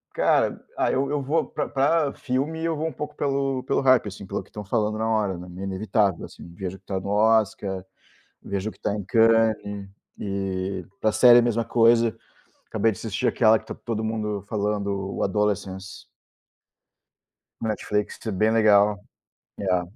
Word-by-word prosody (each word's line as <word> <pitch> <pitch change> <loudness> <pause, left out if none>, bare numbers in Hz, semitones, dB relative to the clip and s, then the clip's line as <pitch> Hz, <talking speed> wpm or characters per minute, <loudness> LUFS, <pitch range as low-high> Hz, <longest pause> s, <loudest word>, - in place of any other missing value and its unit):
Cara, - - +2 0.2
ah, - - +1
eu 135 +1 0
eu 145 -1 0
vou 150 +5 0
para - - -4
para 145 +1 +2
filme, 145 +5 -2
eu 165 - 0
vou 155 +2 -2
um - - -3
pouco 150 +2 -6
pelo 135 -2 -1
pelo - - 0
hype, 130 -5 +4
assim, 100 0 -8
pelo 100 - -3
que - - -19
estão 105 -1 -8
falando 110 +1 0
na 110 0 -1
hora, 105 -4 0
né, 90 +1 -9
meio 90 +2 -7
inevitável, 100 -1 0
assim, - - -13
eu 85 0 -13
vejo 95 0 -5
o - - -25
que 95 - -44
tá 95 -1 -2
no 100 - -6
Oscar, 105 -3 +2 0.6
vejo 100 +2 -3
o - - -13
que - - -25
tá 100 - -1
em 105 -2 -4
Cannes. 110 -2 +2 0.3
E, 95 -1 -3 0.2
pra 110 - +2
série 120 +2 +7
a - - 0
mesma 115 -1 0
coisa. 115 -1 +3 0.5
Acabei 115 - +2
de 100 - -9
assistir 105 -4 -2
aquela 110 -1 +4
que - - -18
tá - - -6
todo 110 -2 -4
mundo 105 -2 -2
falando: 100 -2 -2
"O - - -2
Adolescence." 100 -1 -2 1.6
Netflix 105 -1 -2
t 110 - -4
bem 110 +4 +2
legal. 105 -2 +4 0.6
É, 90 -3 +1
105 Hz, 185 wpm, -24 LUFS, 100-115 Hz, 1.6 s, série